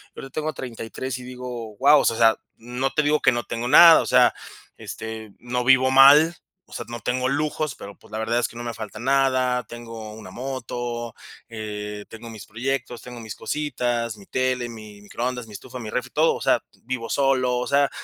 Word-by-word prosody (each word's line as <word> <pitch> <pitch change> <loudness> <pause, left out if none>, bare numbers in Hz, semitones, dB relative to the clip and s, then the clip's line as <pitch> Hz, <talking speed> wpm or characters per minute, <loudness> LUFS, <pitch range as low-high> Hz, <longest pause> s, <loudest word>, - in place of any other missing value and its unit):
y - - -9
ahorita 135 - -9
tengo 155 0 -2
33 125 +1 -6
y - - -10
digo, 125 -3 -7
wao, 145 +5 +6
o - - -2
sea 115 - +2
sea, 115 -1 +5 0.2
no 125 +3 -3
te 150 - +1
digo 150 +1 +2
que - - +5
no 120 0 -2
tengo 115 +1 -4
nada, 165 +5 +9
o - - -4
sea, 125 -1 +5 0.4
este, 110 -1 -7
no 125 0 -2
vivo 130 0 +5
mal, 145 +5 +7 0.3
o - - -14
sea, - - -5
no 120 0 -6
tengo 130 +2 -1
lujos, 150 0 -1
pero, 100 0 -10
pues, - - -20
la 110 - -4
verdad 115 +2 0
es 120 - 0
que 115 - -12
no - - -5
me 120 -1 -4
falta 110 -2 -8
nada, 130 -1 +2
tengo 115 -1 -9
una 105 -4 -11
moto, 120 -2 -5 0.3
eh, 105 -2 -6
tengo 115 +1 -10
mis 110 -2 -10
proyectos, 120 +2 -3
tengo 125 -1 -10
mis 110 -2 -7
cositas, 120 -6 -2
mi 100 - -14
tele, 130 0 -1
mi 110 -3 -11
microondas, 125 +3 -4
mi 105 - -13
estufa, 125 +4 -9
mi 110 -3 -6
refri, 125 - -3
todo, 155 +2 +3
o - - -8
sea, - - +3 0.2
vivo 120 -2 -4
solo, 130 -1 +2
o 125 - -1
sea, 140 0 +3
125 Hz, 210 wpm, -23 LUFS, 115-130 Hz, 0.4 s, nada